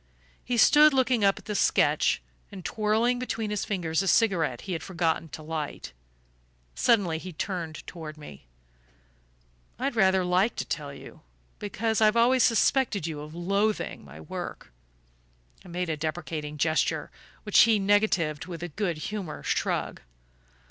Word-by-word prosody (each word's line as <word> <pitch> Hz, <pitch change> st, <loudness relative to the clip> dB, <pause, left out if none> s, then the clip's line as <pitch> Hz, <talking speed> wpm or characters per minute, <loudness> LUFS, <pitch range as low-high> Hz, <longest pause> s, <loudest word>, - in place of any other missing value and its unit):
He 245 Hz, -1 st, -2 dB
stood 300 Hz, +4 st, +6 dB
looking 255 Hz, -4 st, +2 dB
up 195 Hz, -1 st, +4 dB
at -, -, -12 dB
the 210 Hz, -, -3 dB
sketch, -, -, +2 dB, 0.3 s
and 190 Hz, -4 st, -10 dB
twirling 220 Hz, +5 st, +1 dB
between 225 Hz, -4 st, -3 dB
his 210 Hz, -, -2 dB
fingers 170 Hz, -5 st, -1 dB
a 195 Hz, -, -3 dB
cigarette 175 Hz, -, +2 dB
he 190 Hz, -, -5 dB
had 165 Hz, -, -3 dB
forgotten 170 Hz, -3 st, -1 dB
to 155 Hz, -, -9 dB
light. 150 Hz, -, -5 dB, 0.8 s
Suddenly 175 Hz, -, +2 dB
he 185 Hz, +2 st, -8 dB
turned 170 Hz, -2 st, -5 dB
toward 155 Hz, -3 st, -8 dB
me. 70 Hz, -, -12 dB, 1.3 s
"I'd 265 Hz, +1 st, -2 dB
rather 190 Hz, -3 st, +3 dB
like 185 Hz, +5 st, +2 dB
to -, -, -3 dB
tell 145 Hz, -2 st, -4 dB
you 140 Hz, -, -12 dB, 0.4 s
because 220 Hz, +2 st, -1 dB
I've 215 Hz, +1 st, +5 dB
always 250 Hz, +2 st, +4 dB
suspected 230 Hz, -, +2 dB
you 160 Hz, -3 st, -4 dB
of 150 Hz, +2 st, -9 dB
loathing 200 Hz, +5 st, -1 dB
my 70 Hz, +2 st, -12 dB
work." 75 Hz, -5 st, -7 dB, 0.9 s
I -, -, -14 dB
made 180 Hz, +1 st, -3 dB
a 160 Hz, -, -1 dB
deprecating 155 Hz, -1 st, -4 dB
gesture, 155 Hz, +2 st, 0 dB, 0.3 s
which 210 Hz, -, +3 dB
he 225 Hz, -1 st, +6 dB
negatived 195 Hz, -7 st, +1 dB
with 170 Hz, -2 st, -7 dB
a 175 Hz, -, -4 dB
good 175 Hz, 0 st, -2 dB
humoured 180 Hz, -2 st, -6 dB
shrug. -, -, -1 dB
185 Hz, 150 wpm, -27 LUFS, 160-215 Hz, 1.3 s, stood